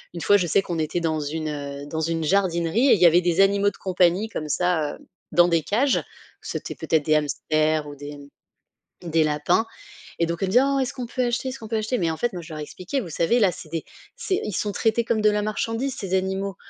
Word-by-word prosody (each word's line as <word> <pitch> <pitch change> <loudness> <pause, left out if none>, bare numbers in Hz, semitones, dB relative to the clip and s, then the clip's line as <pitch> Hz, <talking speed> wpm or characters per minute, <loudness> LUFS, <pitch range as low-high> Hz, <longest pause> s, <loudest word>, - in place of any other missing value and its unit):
une - - -4
fois 205 +6 +4
je 180 - -1
sais 180 - +3
qu'on 175 -4 -3
était 160 +2 -1
dans 160 -2 -1
une, 155 +2 -3
heu, 140 -1 -6
dans 160 +1 -3
une 165 0 -1
jardinerie 185 - +2
et - - +8
il 195 - -3
y - - +8
avait 170 +1 +6
des 175 0 0
animaux 200 +1 +4
de - - -18
compagnie 185 +2 +1
comme 155 -7 -5
ça, 160 -3 0
heu, - - -18 0.3
dans 175 0 +5
des 170 -2 +2
cages. 250 - +1 0.4
C'était - - -5
peut-être 155 -3 0
des 155 - +3
hamsters 155 +1 0
ou 145 - -8
des, 145 +1 -8
mmh, 140 0 -17 0.6
des 160 0 +3
lapins. 150 +8 +1 0.5
Et 170 - +2
donc 170 +1 -4
elles 195 - +1
me - - -3
disaient: 250 +4 +6
«Oh, 275 0 +1
est-ce 260 0 -1
qu'on 250 -3 -5
peut 250 +2 -1
acheter, 240 +2 -1
est-ce 260 - -5
qu'on 220 - -9
peut 225 - -1
acheter?» 220 +3 -1
Mais 170 -3 0
en 160 - -3
fait 240 -1 -1
moi, 175 - -5
je 160 - -11
leur 155 - -6
ai - - -3
expliqué: 185 - -4
«Vous 195 - -7
savez 170 +9 +2
là, 200 -4 +5
c'est 155 - -11
des 165 -1 -3 0.3
c'est 380 -2 -1
ils 210 - -4
sont 210 - -1
traités 225 +4 +1
comme 225 -1 0
de 210 - +5
la 210 0 0
marchandise 225 +5 -2
ces 195 -8 -3
animaux. 190 0 -2
175 Hz, 260 wpm, -24 LUFS, 155-215 Hz, 0.6 s, et